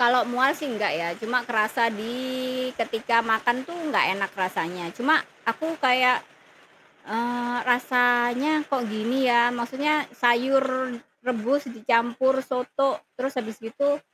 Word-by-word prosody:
Kalau 245 Hz, +1 st, +5 dB
mual 260 Hz, +5 st, +2 dB
sih -, -, -7 dB
nggak 215 Hz, -, -1 dB
ya 170 Hz, -, -2 dB
cuma 240 Hz, +2 st, 0 dB
kerasa 230 Hz, +1 st, +1 dB
di 220 Hz, +3 st, -6 dB, 0.7 s
ketika 230 Hz, +1 st, +1 dB
makan 230 Hz, +1 st, +1 dB
tuh 340 Hz, -, -8 dB
nggak -, -, +3 dB
enak 195 Hz, -1 st, -2 dB
rasanya, 180 Hz, -1 st, -3 dB
cuma 290 Hz, +6 st, +3 dB, 0.3 s
aku 230 Hz, +8 st, -1 dB, 0.2 s
kayak, 250 Hz, -1 st, +5 dB, 0.9 s
eee, 240 Hz, +2 st, -2 dB
rasanya 245 Hz, +2 st, +3 dB, 0.2 s
kok 270 Hz, -3 st, 0 dB
gini 215 Hz, +4 st, -2 dB
ya. 235 Hz, 0 st, +5 dB, 0.2 s
Maksudnya 265 Hz, +6 st, 0 dB, 0.3 s
sayur 255 Hz, +3 st, +4 dB, 0.6 s
rebus 255 Hz, +3 st, -1 dB
dicampur 240 Hz, +3 st, +2 dB
soto 265 Hz, +1 st, -1 dB, 0.3 s
terus 265 Hz, +2 st, -4 dB
habis 225 Hz, -3 st, -5 dB
gitu, 280 Hz, +6 st, -1 dB
245 Hz, 125 wpm, -25 LUFS, 230-260 Hz, 0.9 s, Kalau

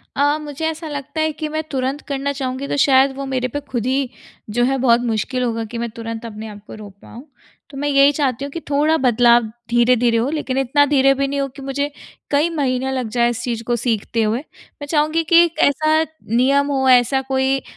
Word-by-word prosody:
अ, 290 Hz, +2 st, +2 dB
मुझे 295 Hz, +1 st, -5 dB
ऐसा 320 Hz, 0 st, -5 dB
लगता 290 Hz, +2 st, -4 dB
है 315 Hz, 0 st, +1 dB
कि 305 Hz, +1 st, -5 dB
मैं 310 Hz, +1 st, -3 dB
तुरंत 270 Hz, +1 st, -2 dB
करना 280 Hz, 0 st, -2 dB
चाहूँगी 265 Hz, 0 st, -4 dB
तो -, -, -2 dB
शायद 270 Hz, 0 st, +4 dB
वो 275 Hz, 0 st, -5 dB
मेरे 255 Hz, -2 st, -1 dB
पे 290 Hz, -, -4 dB
खुद 250 Hz, -5 st, -4 dB
ही 265 Hz, 0 st, 0 dB, 0.4 s
जो 240 Hz, +3 st, 0 dB
है 270 Hz, +2 st, +1 dB
बहुत 240 Hz, -2 st, +3 dB
मुश्किल 245 Hz, +2 st, -1 dB
होगा, 230 Hz, -1 st, -1 dB
कि 235 Hz, +2 st, -7 dB
मैं 235 Hz, 0 st, -3 dB
तुरंत 230 Hz, 0 st, -7 dB
अपने 220 Hz, -1 st, -7 dB
आप 205 Hz, -1 st, -10 dB
को -, -, -9 dB
रोक 210 Hz, -2 st, -11 dB
पाऊँ। 250 Hz, +6 st, -12 dB, 0.4 s
तो 275 Hz, -, -10 dB
मैं 290 Hz, +1 st, -2 dB
यही 275 Hz, 0 st, +5 dB
चाहती 275 Hz, -3 st, -1 dB
हूँ 285 Hz, -, -7 dB
कि 335 Hz, -, -5 dB
थोड़ा 295 Hz, +2 st, +2 dB
बदलाव 240 Hz, -2 st, +4 dB, 0.3 s
धीरे-धीरे 240 Hz, -1 st, +3 dB
हो, 240 Hz, +5 st, 0 dB
लेकिन 295 Hz, -4 st, -3 dB
इतना 270 Hz, +2 st, +3 dB
धीरे 275 Hz, -1 st, +4 dB
भी 275 Hz, 0 st, -1 dB
नहीं 280 Hz, +1 st, -2 dB
हो 275 Hz, -, -1 dB
कि 275 Hz, -, -10 dB
मुझे 280 Hz, +2 st, -2 dB, 0.4 s
कई 295 Hz, +4 st, +2 dB
महीने 265 Hz, -4 st, -1 dB
लग 255 Hz, -3 st, -2 dB
जाएँ 240 Hz, 0 st, +3 dB
इस 235 Hz, -, -4 dB
चीज़ 230 Hz, -2 st, -3 dB
को 240 Hz, +1 st, 0 dB
सीखते 230 Hz, -1 st, -1 dB
हुए। 215 Hz, +3 st, 0 dB
मैं 290 Hz, 0 st, -13 dB
चाहूँगी 310 Hz, +2 st, +1 dB
कि 340 Hz, 0 st, +8 dB
एक 335 Hz, -2 st, -7 dB
ऐसा 310 Hz, +2 st, +3 dB, 0.3 s
नियम 275 Hz, +4 st, +3 dB
हो, 265 Hz, -1 st, +1 dB
ऐसा 255 Hz, +1 st, +4 dB
कोई 265 Hz, 0 st, 0 dB
अ, -, -, -22 dB
265 Hz, 225 wpm, -19 LUFS, 240-285 Hz, 0.4 s, कि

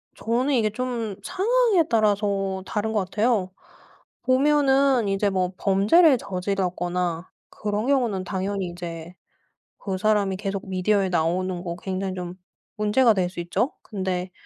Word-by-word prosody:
저는 245 Hz, +5 st, 0 dB
이게 220 Hz, -3 st, +2 dB
좀 235 Hz, -2 st, -3 dB
상황에 420 Hz, 0 st, +2 dB
따라서 200 Hz, -3 st, +1 dB
다른 220 Hz, +2 st, -2 dB
것 215 Hz, -, +2 dB
같아요. 210 Hz, -1 st, 0 dB, 0.7 s
보면은 270 Hz, -2 st, +3 dB
이제 195 Hz, +1 st, +1 dB
뭐 185 Hz, -1 st, -1 dB
범죄를 220 Hz, -, +4 dB
저질렀거나 180 Hz, -3 st, -2 dB, 0.2 s
그런 210 Hz, +2 st, -3 dB
경우는 240 Hz, -9 st, +1 dB
당연히 190 Hz, 0 st, -3 dB
이제 175 Hz, -1 st, -7 dB, 0.6 s
그 190 Hz, -2 st, -4 dB
사람이 205 Hz, -2 st, +1 dB
계속 195 Hz, 0 st, -4 dB
미디어에 190 Hz, +1 st, +1 dB
나오는 180 Hz, +1 st, 0 dB
거 170 Hz, -2 st, -4 dB
굉장히 190 Hz, 0 st, -3 dB
좀 180 Hz, -1 st, -6 dB, 0.4 s
문제가 220 Hz, +3 st, +4 dB
될 185 Hz, -3 st, 0 dB
수 180 Hz, -, -9 dB
있죠. 175 Hz, -, -1 dB
근데 185 Hz, -3 st, -3 dB
200 Hz, 280 characters per minute, -24 LUFS, 185-230 Hz, 0.7 s, 범죄를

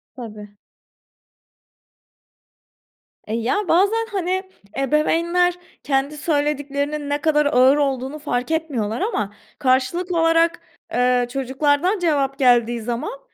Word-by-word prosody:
Tabii. 210 Hz, -4 st, -10 dB, 2.7 s
E, 215 Hz, -, -4 dB
ya, 255 Hz, -, -1 dB
bazen, 405 Hz, +6 st, +3 dB
hani, 375 Hz, -1 st, -1 dB, 0.3 s
ebeveynler 335 Hz, +6 st, +2 dB, 0.3 s
kendi 275 Hz, +2 st, -1 dB
söylediklerinin 290 Hz, -1 st, -1 dB
ne 290 Hz, 0 st, -1 dB
kadar 300 Hz, -1 st, +2 dB
ağır 270 Hz, 0 st, +4 dB
olduğunu 275 Hz, +1 st, -1 dB
fark 250 Hz, -1 st, -2 dB
etmiyorlar 275 Hz, -8 st, -2 dB
ama 210 Hz, -, -2 dB, 0.3 s
karşılıklı 300 Hz, +7 st, +1 dB
olarak, 330 Hz, +1 st, +3 dB, 0.3 s
eee, 250 Hz, 0 st, +2 dB
çocuklardan 285 Hz, -, 0 dB
cevap 280 Hz, -5 st, 0 dB
geldiği 240 Hz, -2 st, +3 dB
zaman 245 Hz, -, -4 dB
290 Hz, 100 wpm, -21 LUFS, 255-330 Hz, 2.7 s, ağır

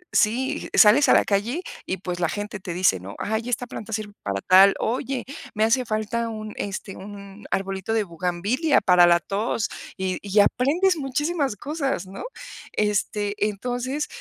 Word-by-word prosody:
sí, 260 Hz, +7 st, +1 dB
sales 255 Hz, +6 st, +7 dB
a -, -, +7 dB
la -, -, +5 dB
calle, 225 Hz, -, 0 dB, 0.2 s
y, 190 Hz, -, -2 dB
pues, 180 Hz, -1 st, -5 dB
la 175 Hz, -2 st, +1 dB
gente 205 Hz, +4 st, -5 dB
te 185 Hz, -2 st, -6 dB
dice, 180 Hz, -, +3 dB
¿no? 95 Hz, +3 st, -9 dB
"Ay, 220 Hz, +3 st, -2 dB
esta 245 Hz, 0 st, -1 dB
planta 225 Hz, -2 st, -8 dB
sirve 210 Hz, -1 st, -4 dB
para 100 Hz, -1 st, -3 dB
tal, 190 Hz, -, +6 dB
oye, 255 Hz, +2 st, -2 dB, 0.3 s
me 215 Hz, -, +2 dB
hace 245 Hz, +3 st, +2 dB
falta 225 Hz, +1 st, -2 dB
un, 215 Hz, -1 st, -6 dB
este, 195 Hz, -1 st, -5 dB
un 200 Hz, +1 st, -10 dB
arbolito 195 Hz, +2 st, -2 dB
de 225 Hz, -1 st, +2 dB
buganvilia 185 Hz, -, 0 dB
para 180 Hz, -3 st, +5 dB
la 170 Hz, 0 st, +5 dB
tos", 210 Hz, +4 st, -2 dB, 0.3 s
y 190 Hz, -1 st, -2 dB
y 205 Hz, +1 st, +1 dB
aprendes 320 Hz, -, +3 dB
muchísimas 290 Hz, -1 st, -1 dB
cosas, 275 Hz, -, -3 dB
¿no? 190 Hz, +1 st, -8 dB, 0.5 s
Este, 210 Hz, 0 st, 0 dB
entonces, 245 Hz, +7 st, -3 dB
210 Hz, 165 wpm, -24 LUFS, 195-250 Hz, 0.5 s, sales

